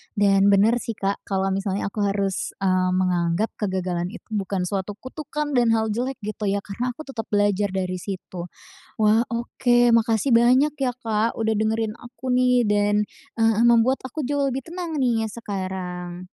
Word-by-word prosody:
Dan 200 -1 +4
benar 205 +4 +4
sih, 230 -1 -5
Kak, 200 0 -2
kalau 195 -1 0
misalnya 195 +1 -2
aku 215 - -6
harus, 195 -1 -2
mmm, 185 -1 +2
menganggap 180 +2 +1
kegagalan 185 -3 -1
itu - - -11
bukan 195 -3 -1
suatu 195 +2 -3
kutukan 295 +5 -5
dan 240 -4 +3
hal 220 -1 0
jelek 250 +5 -2
gitu 210 0 -3
ya, 200 0 0
karena 240 +5 -4
aku 310 - -8
tetap 245 -6 -6
belajar 205 -1 +2
dari 185 -1 -2
situ. 180 -2 -6 0.5
Wah 215 +1 +4
oke, 240 0 +2
makasih 230 +2 +2
banyak 255 +5 +4
ya, 270 -3 0
Kak, 225 -1 -1
udah 220 -1 +1
dengerin 220 0 0
aku 250 +2 -5
nih 250 -1 +3
dan, 205 0 +2 0.3
eee, 225 0 +3
membuat 235 +2 +4
aku 260 +2 -4
jauh 280 0 0
lebih 265 0 -4
tenang 335 -2 -4
nih 230 -4 +1
sekarang. 185 -4 -5
215 Hz, 165 wpm, -23 LUFS, 195-240 Hz, 0.5 s, Dan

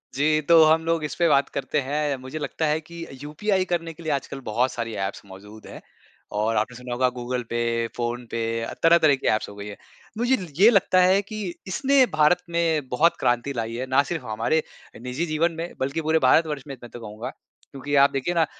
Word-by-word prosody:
जी 155 +2 +2
तो 165 -1 +8
हम 160 +1 +4
लोग 165 -1 0
इस 150 - -3
पे 170 - +2
बात 140 -1 +3
करते 150 - -2
हैं। 145 +1 -1
मुझे 130 +4 -6
लगता 160 +2 -2
है 150 +1 +1
कि 170 +1 -9 0.2
यूपीआई 190 +6 0
करने 170 -2 -2
के 165 - -13
लिए 160 - -2
आजकल 140 -1 -3
बहुत 120 +4 +1
सारी 115 -2 -4
ऐप्स 95 - -6
मौजूद 105 +3 -13
हैं - - -10 0.6
और 110 +2 +1
आपने 110 +4 -1
सुना 125 0 -6
होगा 125 +1 +2
गूगल-पे, 120 -1 -3 0.3
फोन-पे 120 -1 -3 0.4
तरह-तरह 165 -3 +5
की 135 - -4
ऐप्स 110 - -4
हो 100 - -11
गई 100 0 -8
हैं। 105 - -8 0.4
मुझे 245 +3 +2 0.3
ये 215 - +9
लगता 195 -4 +3
है 185 +2 +4
कि 215 +2 -8 0.3
इसने 265 +7 +3
भारत 175 +4 +4
में 165 -4 0
बहुत 155 +8 +3
क्रांति 120 +3 0
लाई 115 -2 -3
है, 125 +2 -3
न 140 +2 +5
सिर्फ़ 165 -7 -4
हमारे 115 +9 0 0.5
निजी 130 +7 -2
जीवन 165 +2 +2
में 170 - -6
बल्कि 140 +5 -1
पूरे 160 +1 +2
भारतवर्ष 150 -1 +3
में, 135 - -6
मैं 120 - -9
तो 120 - -10
कहूँगा। 110 +1 -7 0.4
क्योंकि 145 +1 -3
आप - - +2
देखिए 135 +6 -1
न 165 - +4
145 Hz, 205 wpm, -24 LUFS, 120-165 Hz, 0.6 s, ये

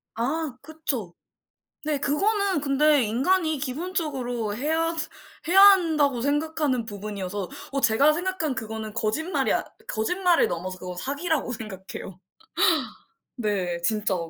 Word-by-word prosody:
아 270 +3 -2
그쵸. 275 - -4 0.7
네 300 -2 0
그거는 390 +4 +1
근데 285 0 +3
인간이 310 - +1
기본적으로 265 - -2
해야 325 +5 0 0.5
해야 385 +2 +6
한다고 320 -10 +5
생각하는 290 -3 0
부분이어서 200 -3 -5 0.2
어 275 - 0
제가 275 +7 +4
생각한 345 -4 -1
그거는 220 -1 -5
거짓말이 315 - 0
아 - - 0 0.2
거짓말을 355 - +2
넘어서 185 +2 -4
그건 180 0 -7
사기라고 285 - -1
생각해요. 190 -4 -8 1.2
네. 190 -7 -1
진짜. 210 +1 +1
275 Hz, 280 characters per minute, -25 LUFS, 215-320 Hz, 1.2 s, 해야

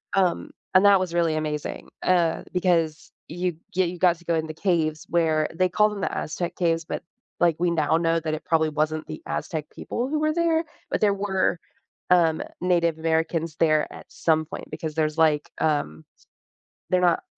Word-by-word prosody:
um, 185 -3 +1 0.2
and 185 +2 +6
that 200 -2 +7
was 180 -2 -3
really 165 -2 +2
amazing, 150 -1 -4
uh, 175 -3 +2
because 170 -4 0 0.2
you 175 0 -2 0.2
yeah, 185 0 +3
you 175 +1 -4
got 175 -2 +4
to 175 - -20
go 170 -1 +1
in 160 0 -1
the 155 - -6
caves 160 -4 0
where 160 -2 +2
they 185 +2 +1
call 210 +4 +3
them 205 -2 -6
the - - -2
Aztec 170 +2 -3
caves, 165 -2 +1
but, - - -5 0.4
like, 170 -2 +3
we 175 0 +2
now 155 -1 +2
know 165 0 +1
that 155 -1 -3
it 155 - -4
probably 160 -1 +2
wasn't 155 +1 -1
the 155 - -7
Aztec 155 -3 -3
people 245 +2 -4
who 305 - 0
were 310 0 +1
there, 335 -1 +2 0.3
but - - 0
there 205 -1 +4
were, 190 -3 0 0.5
um, 165 -3 +4 0.2
Native 170 -3 +2
Americans 160 0 0
there 155 -2 +3
at - - -11
some 160 -1 +1
point, - - -8
because 155 -1 -5
there's, 155 0 0
like, 150 -2 +3
um, 80 - 0 0.9
they're 185 - +3
not, 170 - +1
165 Hz, 190 wpm, -25 LUFS, 155-180 Hz, 0.9 s, that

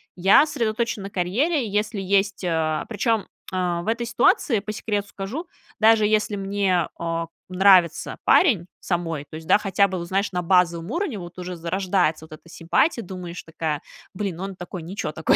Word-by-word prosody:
я 195 - +6
сосредоточена 230 -5 -2
на 195 - -6
карьере, 235 - 0
и - - -5
если 210 0 -1
есть, 195 0 +1
а, 160 -2 0
причем, 225 -1 0 0.2
а, 180 -2 -1
в 175 - -3
этой 235 +1 -1
ситуации, 235 0 +3
по 210 +2 -6
секрету 205 -1 -3
скажу, 220 - -5 0.3
даже 220 -1 +5
если 210 -1 +1
мне, 195 -3 0
а, 165 0 -2 0.2
нравится 185 -2 +4
парень 225 - +4
самой, 165 -5 -2
то - - -9
есть, 160 0 -8
да, 180 - +5
хотя 200 -1 +2
бы, 185 -2 -4
вот 170 - -6
знаешь, 195 +3 0
на 180 -1 -1
базовом 170 -1 +2
уровне 315 - -2
вот 175 0 -10
уже 180 0 -5
зарождается 175 -1 0
вот 160 - -21
эта 155 +2 -12
симпатия, 175 - +1
думаешь 180 -2 -7
такая: 160 -2 -3 0.3
"Блин, 185 -4 -3
он 195 0 -5
такой, 180 0 -7
ниче 165 -2 -4
такой". 160 0 +2
190 Hz, 180 wpm, -23 LUFS, 170-210 Hz, 0.3 s, я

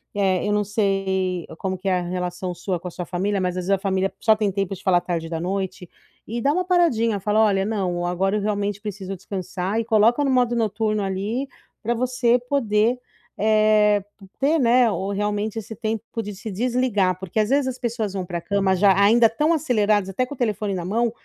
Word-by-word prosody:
eh, 195 -1 +1
eu - - 0
não 210 0 +2
sei 195 -3 -1
como 190 -1 -2
que 195 - -6
é 180 -1 +2
a - - -3
relação 180 0 -3
sua 180 0 -3
com 180 - -8
a - - -13
sua 180 0 -6
família, 195 +3 -1
mas 180 -1 0
às 180 - -3
vezes - - -5
a 195 - +4
família 195 0 0
só 220 -1 +4
tem 210 -2 0
tempo 195 0 -2
de 185 - -14
falar 180 -2 +3
tarde 165 -2 -3
da 165 -1 -3
noite, 185 0 -3 0.4
e 235 +2 -3
dá 285 +4 +2
uma 365 +1 0
paradinha, 235 - +2
fala: 210 +3 +2
"Olha, 195 -2 +2
não, 185 -5 -1
agora 195 +4 0
eu - - -2
realmente 205 -1 -2
preciso 195 -2 -5
descansar." 190 +2 -3
e 230 - -2
coloca 230 +5 +3
no 275 - +1
modo 245 -2 +2
noturno 215 -1 0
ali 205 +8 -2 0.4
pra 235 +2 +1
você 250 0 +2
poder, 235 -2 +2 0.4
eh, 215 -1 +3 0.2
p 195 - -13
ter, 300 +4 +2
né, 240 -2 +4
o 195 0 -3
realmente 210 +1 -2
esse 220 +1 -8
tempo 220 +1 -3 0.2
de 205 -1 -7
se 215 +2 -7
desligar, 220 -4 +1
porque 190 +3 -3
às 215 - +1
vezes 280 0 +2
as 255 -1 -4
pessoas 225 -5 -2
vão 190 -2 -3
pra 175 -2 -4
cama 195 -1 +1
já 195 +1 +5
ainda 225 +2 +6
tão 300 +8 +1
aceleradas 215 - +1
até 255 +7 -1
com 285 - -7
o - - -23
telefone 210 -4 -1
na 175 -1 -4
mão, 230 +4 0
205 Hz, 215 wpm, -23 LUFS, 190-230 Hz, 0.4 s, ainda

